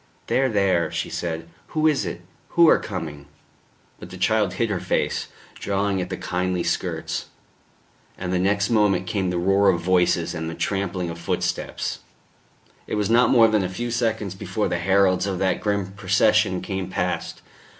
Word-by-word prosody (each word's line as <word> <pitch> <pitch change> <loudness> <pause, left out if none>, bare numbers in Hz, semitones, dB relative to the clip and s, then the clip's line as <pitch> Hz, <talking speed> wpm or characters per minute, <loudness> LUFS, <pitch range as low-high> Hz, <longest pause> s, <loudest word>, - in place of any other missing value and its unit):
"There, 130 0 +2
there," 100 -6 +2
she - - -3
said. 80 -1 -4 0.3
"Who 155 - +2
is 135 - +2
it? 85 - -5 0.4
Who 170 -1 +8
are - - +5
coming?" 80 -8 -6 0.7
But - - -10
the 95 - -9
child 105 0 +1
hid 115 -2 -1
her 95 - -1
face, - - -1 0.3
drawing 100 -1 -1
at 90 - -4
the - - -4
kindly 90 -1 -1
skirts; - - -2 0.9
and 90 0 -3
the 90 - +1
next 100 +3 +1
moment 100 -5 +3
came 95 0 -1
the 90 - -1
roar 95 +3 +3
of 90 -3 +2
voices 90 -1 +2
and 80 -1 -4
the 80 - -6
trampling 95 -3 -2
of 85 - -8
footsteps. 85 - -2 0.9
It - - -2
was 105 +1 0
not 120 +2 +5
more 115 -3 +6
than 110 -3 +2
a 90 - -2
few 120 +6 -4
seconds 110 -5 -1
before 95 - -2
the 85 - -1
heralds 95 +1 +3
of 95 -2 -2
that 95 0 0
grim 100 -2 -1
procession 100 0 +2
came 95 -2 -4
past. 90 -1 -3
95 Hz, 175 wpm, -23 LUFS, 90-105 Hz, 0.9 s, Who